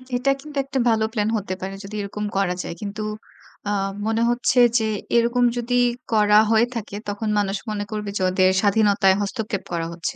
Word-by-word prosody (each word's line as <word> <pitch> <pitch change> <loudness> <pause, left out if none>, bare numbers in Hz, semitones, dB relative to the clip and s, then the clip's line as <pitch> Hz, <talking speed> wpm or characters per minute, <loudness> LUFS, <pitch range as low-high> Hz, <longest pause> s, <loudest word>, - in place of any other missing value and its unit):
এটা 255 +3 +1
কিন্তু 295 0 -9
একটা 270 -1 -2
ভালো 220 -1 +2
প্ল্যান 210 -1 0
হতে 190 -2 -4
পারে 190 +1 -4
যদি 200 +2 -8
এরকম 210 +1 -4
করা 185 -2 +1
যায়। - - -5
কিন্তু 210 +1 -5 0.7
আ - - 0 0.4
মনে 225 +1 +1
হচ্ছে 240 +1 +2 0.2
যে 220 - 0 0.3
এরকম 235 +1 +3
যদি 240 +1 -1 0.4
করা 210 -1 +5
হয়ে 225 +1 +5
থাকে, 210 -3 -5
তখন 210 +1 -3
মানুষ 200 0 -1
মনে 205 -1 -2
করবে 210 -1 -4
যে - - -4
ওদের 185 0 +3
স্বাধীনতায় 200 -2 +3
হস্তক্ষেপ 200 0 -3
করা 165 -1 -1
হচ্ছে। 170 - -4
210 Hz, 185 wpm, -22 LUFS, 195-225 Hz, 0.7 s, করা